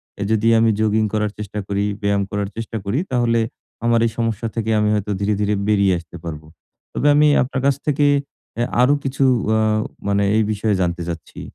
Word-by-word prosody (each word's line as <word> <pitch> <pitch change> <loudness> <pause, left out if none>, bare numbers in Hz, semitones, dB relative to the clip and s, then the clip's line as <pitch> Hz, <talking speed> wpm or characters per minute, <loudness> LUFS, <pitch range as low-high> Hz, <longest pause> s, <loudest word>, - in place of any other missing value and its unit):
অ্যা 100 - -4
যদি 110 0 +2
আমি 115 - +4
জগিং 110 0 +2
করার 105 -1 0
চেষ্টা 105 0 -5
করি, 100 0 -1 0.2
ব্যায়াম 100 -1 +1
করার 100 -1 -2
চেষ্টা 115 0 -4
করি 110 +9 0
তাহলে 120 -2 +2 0.5
আমার 115 0 +3
এই - - -3
সমস্যা 115 -1 -1
থেকে 115 -1 -2
আমি 105 0 +2
হয়তো 105 0 -2
ধীরে, 100 +1 +1
ধীরে 105 0 +1
বেরিয়ে 100 -3 +3
আসতে 85 +1 -12
পারবো। 75 -2 -7 0.5
তবে 145 - 0
আমি 150 0 +5 0.2
আপনার 130 +1 -3
কাছ 140 - +3
থেকে 145 0 +2 0.5
অ্যা 120 - +1 0.2
আরো 135 +3 +5
কিছু 135 0 -1 0.3
আ - - +2 0.5
মানে 100 0 +2
এই 110 - +3
বিষয়ে 105 0 0
জানতে 85 0 -1
চাচ্ছি? 80 -2 -7
105 Hz, 190 wpm, -20 LUFS, 100-115 Hz, 0.5 s, আমি